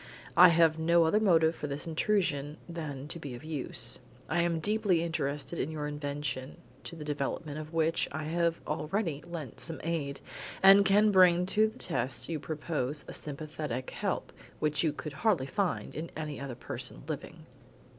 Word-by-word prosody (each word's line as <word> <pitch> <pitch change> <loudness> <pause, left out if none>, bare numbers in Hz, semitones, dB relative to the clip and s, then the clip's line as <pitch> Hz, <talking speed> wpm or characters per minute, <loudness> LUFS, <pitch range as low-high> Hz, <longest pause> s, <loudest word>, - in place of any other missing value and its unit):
I 180 +2 +10
have 165 -2 +4
no 170 +1 +4
other 165 +6 +3
motive 165 -6 +4
for 150 - -5
this 140 +1 -4
intrusion 160 -4 0
than 150 -5 -6
to 170 - -5
be 140 -6 -6
of 120 - -11
use. 155 -4 +1 0.3
I 170 - +1
am 170 -1 +1
deeply 205 -2 +2
interested 150 -2 -2
in - - -1
your 155 -2 -4
invention, 145 -2 -4 0.3
to 170 - -5
the 160 - -7
development 150 +1 -3
of 155 0 -8
which 165 0 +1
I 155 +2 -4
have 170 +1 0
already 155 0 -2
lent 160 -8 -7
some 165 0 -3
aid, 150 -4 -2 0.4
and 195 +1 +9
can 210 +2 +5
bring 180 -2 +6
to 215 +3 +3
the 220 - -10
test 125 +4 -1
you 160 -2 -2
propose 150 -2 -3
a - - -7
sympathetic 150 -3 -4
help - - -3 0.2
which 150 +1 +1
you 160 - +2
could 150 0 -7
hardly 180 -3 +1
find 180 +7 -2
in 165 +2 -5
any 150 -2 -4
other 135 -3 -5
person - - -3
living." - - -6
155 Hz, 175 wpm, -30 LUFS, 145-170 Hz, 0.4 s, I